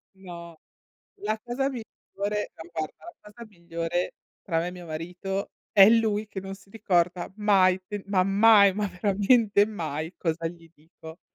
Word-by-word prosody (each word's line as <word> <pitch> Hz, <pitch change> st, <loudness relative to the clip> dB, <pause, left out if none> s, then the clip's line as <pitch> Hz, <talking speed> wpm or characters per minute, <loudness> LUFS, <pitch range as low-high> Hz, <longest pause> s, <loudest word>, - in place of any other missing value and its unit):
No. 170 Hz, -3 st, -11 dB, 0.6 s
La 215 Hz, +1 st, -1 dB
cosa 250 Hz, +4 st, -2 dB
miglior 240 Hz, -5 st, -6 dB, 0.3 s
ma 200 Hz, -5 st, -3 dB
guarda, 155 Hz, -, -5 dB, 0.2 s
la 210 Hz, 0 st, -15 dB
cosa 235 Hz, +1 st, -11 dB
migliore 170 Hz, -2 st, -3 dB, 0.3 s
tra 165 Hz, -3 st, -1 dB
me 170 Hz, -, -2 dB
e -, -, -5 dB
mio 180 Hz, -1 st, -10 dB
marito, 180 Hz, +5 st, -4 dB, 0.2 s
è 195 Hz, -1 st, +8 dB
lui 220 Hz, -2 st, +2 dB
che 195 Hz, -, -6 dB
non 195 Hz, 0 st, -7 dB
si 195 Hz, -, -21 dB
ricorda 180 Hz, -5 st, 0 dB
mai 190 Hz, -3 st, +3 dB
fe 205 Hz, -2 st, -5 dB
ma 190 Hz, -2 st, +2 dB
mai, 200 Hz, 0 st, +6 dB
ma 210 Hz, 0 st, -1 dB
veramente 205 Hz, +3 st, +3 dB
mai 160 Hz, -5 st, -5 dB
cosa 165 Hz, -1 st, -1 dB
gli 165 Hz, 0 st, -12 dB
dico. 160 Hz, +1 st, -14 dB
195 Hz, 160 wpm, -26 LUFS, 170-210 Hz, 0.6 s, è